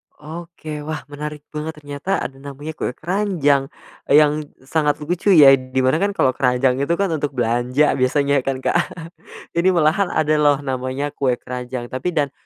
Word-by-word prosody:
Oke, 155 0 -8
wah 155 -1 -3
menarik 150 0 -6
banget 155 +1 -5
ternyata 145 +5 -3
ada 135 - -6
namanya 140 +2 -7
kue 150 -4 -4
keranjang, 165 -7 +1 0.4
yang 150 +1 +4 0.2
sangat 150 +1 +1
lucu 175 +5 -3
ya, 145 -4 +9
di 130 0 -2
mana 130 +5 +2
kan 200 +1 0
kalau 130 - +3
keranjang 125 0 +1
itu 140 +5 +1
kan 195 0 0
untuk 145 -3 -2
belanja 120 +4 +2
biasanya 140 +2 +2
kan, 130 0 -3
Kak, - - +2 0.7
ini 170 +2 +2
malahan 170 +4 +3
ada 155 -2 +1
loh, 145 -1 +3
namanya 130 +2 -3
kue 130 -3 0
keranjang, 125 0 -6
tapi 140 +7 -3
dan, 145 -3 +1
145 Hz, 165 wpm, -20 LUFS, 130-155 Hz, 0.7 s, ya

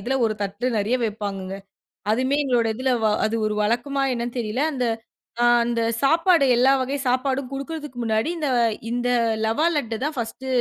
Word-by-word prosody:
இதில 250 +7 -2
ஒரு 215 - -1
தட்டு 200 +5 -3
நிறைய 220 +5 +1
வைப்பாங்கங்க. 200 -3 -4 0.6
அதுமே 260 +5 +1
எங்களோட 240 -4 +2
இதில 260 +2 0
வ - - +4 0.2
அது 220 +1 0
ஒரு 210 - -2
வழக்கமா 270 +5 0
என்னன்னு 240 +1 -4
தெரியல 230 +4 -2
அந்த, 250 -2 -1 0.6
அ - - +4 0.2
அந்த 235 -1 0 0.2
சாப்பாடு 330 +1 +4
எல்லா 260 +2 +5
வகை 275 +2 -2
சாப்பாடும் 260 +1 0
குடுக்குறதுக்கு 280 -1 -6
முன்னாடி 220 +6 0
இந்த 300 -3 -2 0.4
இந்த 245 0 0 0.4
ரவா 225 +9 +1
லட்டு 230 -6 -1
தான் 300 -1 -3
ஃபர்ஸ்ட்டு 235 +3 -5
245 Hz, 165 wpm, -23 LUFS, 225-275 Hz, 0.6 s, எல்லா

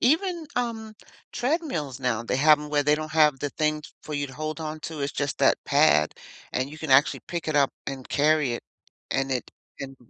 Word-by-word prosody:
Even, 330 +5 +1
um, 225 -3 -2 0.4
treadmills 245 - -2
now, 120 -3 0
they 120 - -1
have 150 +2 +6
'em 150 - -7
where 145 -1 +2
they 150 +1 +4
don't 155 0 -5
have 150 -3 +4
the 145 - -2
thing 155 0 -1 0.2
for 150 - -6
you 145 0 -1
to 130 - -12
hold 155 +1 -4
onto 155 0 -5
it's, 140 0 -2
just, 145 -1 -2
that 135 - +4
pad, 140 - +4 0.4
and 130 +2 -1
you 155 - -10
can 160 -4 -5
actually 135 +3 +5
pick 170 -2 -5
it 150 - 0
up 140 -2 +3
and 135 -2 -6
carry 150 -3 +2
it, 120 - -4 0.5
and 135 0 0
it, 125 - -3 0.3
and 135 -1 -7
150 Hz, 210 wpm, -26 LUFS, 135-160 Hz, 0.5 s, have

